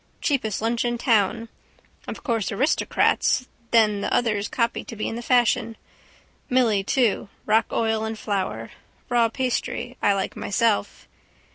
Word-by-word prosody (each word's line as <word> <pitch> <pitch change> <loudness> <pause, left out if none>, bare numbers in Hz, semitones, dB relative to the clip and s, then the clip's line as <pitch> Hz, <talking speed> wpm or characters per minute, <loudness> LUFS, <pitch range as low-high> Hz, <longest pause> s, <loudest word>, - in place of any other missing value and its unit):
Cheapest 220 -8 -1
lunch 230 +1 0
in 240 0 -1
town. 230 -2 +1 0.6
Of - - -7
course 230 -7 -1
aristocrats, 255 +1 +1 0.2
then 215 -3 +3
the - - -2
others 215 -3 +1
copy 235 -1 -1
to 230 - -8
be 215 - -3
in - - -4
the 235 - -5
fashion. 235 -2 +2 0.7
Milly 230 -6 +2
too 225 -3 +1 0.2
rock 220 +1 +3
oil 220 -1 0
and 220 0 -4
flour. 190 - -3 0.4
Raw 235 -2 +3
pastry 250 0 -3
I 205 - +4
like 195 -1 -2
myself. 225 0 0
225 Hz, 140 wpm, -24 LUFS, 210-240 Hz, 0.7 s, I